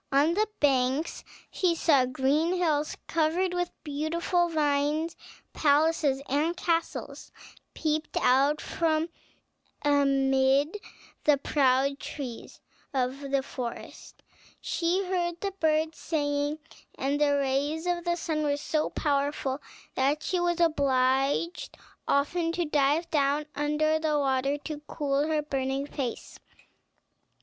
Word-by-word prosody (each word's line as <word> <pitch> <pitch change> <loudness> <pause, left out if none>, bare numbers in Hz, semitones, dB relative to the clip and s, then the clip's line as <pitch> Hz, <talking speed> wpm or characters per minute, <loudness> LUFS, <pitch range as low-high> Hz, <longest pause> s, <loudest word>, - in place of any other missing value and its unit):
On 285 +4 +4
the 425 +4 +1
banks 270 +2 +1 0.3
she 355 -3 +1
saw 280 -6 +3
green 285 +7 +1
hills 310 -4 0
covered 335 +3 +1
with 355 0 -1
beautiful 335 +4 0
vines; 300 +1 0 0.4
palaces 295 -2 +2
and 310 +6 0
castles 335 -2 -2 0.4
peeped 310 -1 -1
out 275 +4 +3
from 320 0 0 0.7
amid 275 +2 +3 0.5
the 295 -1 +5
proud 275 0 +2
trees 255 -6 -7 0.4
of 260 +1 0
the 275 -1 +1
forest; 245 -3 -8 0.4
she 360 +3 0
heard 345 -2 -1
the 395 +1 -2
birds 315 0 +1
singing, 290 -1 -1 0.4
and 280 +2 -1
the 290 -1 +4
rays 280 +4 -1
of 350 -1 -1
the 345 0 0
sun 320 -2 -2
were 290 -1 +1
so 305 +1 -1
powerful 280 -1 -1 0.3
that 280 +3 +1
she 365 - 0
was 350 0 0
obliged 280 +1 +1 0.3
often 330 +4 +1
to 345 0 -1
dive 295 +2 +2
down 290 -1 +1
under 300 +2 +1
the 310 -1 +1
water 275 0 +1
to 295 0 -6
cool 285 0 0
her 310 -1 0
burning 270 -1 -2
face. 270 -4 -5
295 Hz, 120 wpm, -28 LUFS, 275-325 Hz, 0.7 s, the